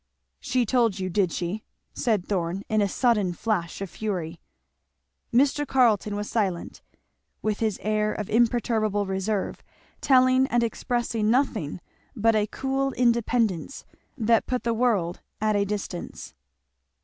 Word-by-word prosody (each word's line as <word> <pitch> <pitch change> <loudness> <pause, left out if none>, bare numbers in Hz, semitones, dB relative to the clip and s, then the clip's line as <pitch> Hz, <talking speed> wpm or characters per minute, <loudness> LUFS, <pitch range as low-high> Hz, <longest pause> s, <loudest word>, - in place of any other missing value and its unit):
"She 250 -1 0
told 230 -4 +2
you, 185 -1 -3
did 185 -2 +1
she?" 180 +7 -3 0.3
said 215 -7 0
Thorn 185 0 -2
in 215 -1 +2
a 200 - +3
sudden 210 -6 +2
flash 185 -3 -2
of 195 - -4
fury. 175 -6 -4 0.9
Mr. 280 +4 +2
Carleton 220 -6 +3
was 205 0 -3
silent, 190 -6 -2 0.6
with 215 -1 -1
his 215 -4 0
air 215 0 +1
of 210 -2 -4
imperturbable 220 -3 +1
reserve, 195 +1 -2 0.4
telling 255 0 +4
and 240 -2 +1
expressing 230 -1 -1
nothing 225 - 0 0.3
but 225 -1 +3
a 210 -1 +2
cool 270 +3 -1
independence 235 - 0 0.3
that 230 -1 +2
put 250 -1 -1
the 235 - +1
world 215 -8 +1 0.2
at 215 0 +1
a 200 0 +2
distance. 200 -3 -5
215 Hz, 135 wpm, -25 LUFS, 195-240 Hz, 0.9 s, telling